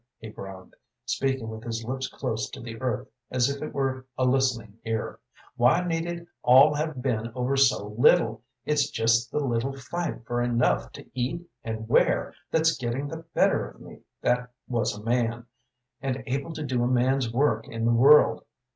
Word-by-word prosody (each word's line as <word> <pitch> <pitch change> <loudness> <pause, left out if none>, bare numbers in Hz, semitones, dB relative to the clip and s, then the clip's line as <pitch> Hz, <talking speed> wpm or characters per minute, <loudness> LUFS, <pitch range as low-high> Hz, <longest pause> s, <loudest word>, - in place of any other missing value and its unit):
he 110 - -9
groaned, 95 -2 -10 0.3
speaking 135 -4 -1
with 110 0 -7
his 115 -1 -4
lips 130 +2 -3
close 110 -3 -3
to - - -9
the 115 0 -8
earth 130 0 -2 0.2
as 125 +1 +2
if 140 - -6
it 155 - -4
were 135 -1 -1
a 130 - +2
listening 125 -5 0
ear. 110 -1 -3 0.4
"Why 130 +9 +4
need 165 -1 -1
it 170 0 -5 0.2
all 135 +5 +7
have 150 -3 -3
been 115 -3 -1
over 130 +2 0
so 135 -6 +3
little? 110 0 +3 0.2
It's 145 -2 +2
just 115 -1 +2
the - - -2
little 135 +1 -1
fight 150 -1 -4
for 120 +1 -1
enough 120 0 +1
to - - -10
eat 145 +8 -3 0.2
and 110 -1 -5
wear 115 - +2 0.2
that's 160 0 +3
getting 125 +3 -3
the 160 +1 -7
better - - +2
of - - -18
me - - -12 0.2
that 125 0 +1 0.2
was 115 -4 -1
a 105 - -10
man, 120 0 0 0.6
and 135 -1 -2
able 140 +5 -2
to 155 - -5
do 125 -3 0
a - - +2
man's 125 0 +2
work 115 -3 +1
in 115 0 -3
the 120 - +3
world. 140 +6 +6
125 Hz, 180 wpm, -26 LUFS, 115-135 Hz, 0.6 s, all